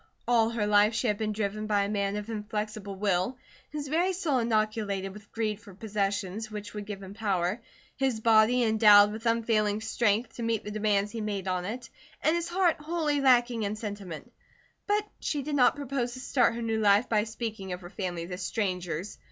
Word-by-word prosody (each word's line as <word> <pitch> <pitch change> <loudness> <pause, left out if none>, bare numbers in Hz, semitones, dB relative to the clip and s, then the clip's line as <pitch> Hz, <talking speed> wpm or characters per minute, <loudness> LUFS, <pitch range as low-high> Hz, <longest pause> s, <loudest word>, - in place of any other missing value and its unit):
All 230 -2 +4
her 230 -2 -1
life 210 +1 +4
she 220 - -1
had 210 -3 +1
been 215 -1 -1
driven 215 0 -2
by 205 -1 +2
a - - -1
man 200 -1 -1
of 210 0 -4
inflexible 210 -2 -4
will, 195 +4 0 0.3
his 295 -1 -5
very 345 +6 +1
soul 330 -8 0
inoculated 215 -4 0
with 205 0 -14
greed 215 -2 -2
for 200 -2 -14
possessions 205 0 -2
which 210 -1 -7
would 210 -1 -6
give 200 -2 -6
him 190 +1 -9
power; 200 -1 -1 0.4
his 265 -4 0
body 225 +2 +4
endowed 210 -2 +7
with 220 +2 -4
unfailing 220 -2 +2
strength 220 +1 0
to - - -5
meet 230 -2 0
the 210 - -6
demands 210 -1 +1
he 225 - -4
made 200 -3 -3
on 180 -1 -1
it, 240 +6 -5 0.4
and 315 - +3
his 340 0 -1
heart 355 -1 +2
wholly 300 -2 0
lacking 245 -3 +4
in 205 0 -1
sentiment; 205 -7 -7 0.6
but 415 0 +1
she 290 -3 -2
did 295 +2 -4
not 265 -3 +4
propose 270 -4 -2
to 255 - -8
start 250 -2 +2
her 235 - -4
new 225 -1 0
life 205 +3 +4
by 215 -2 +2
speaking 220 -3 -5
of 180 +1 -5
her 175 - -9
family 175 -4 -4
to 180 +1 -6
strangers. 180 -2 -3
215 Hz, 200 wpm, -28 LUFS, 205-235 Hz, 0.6 s, endowed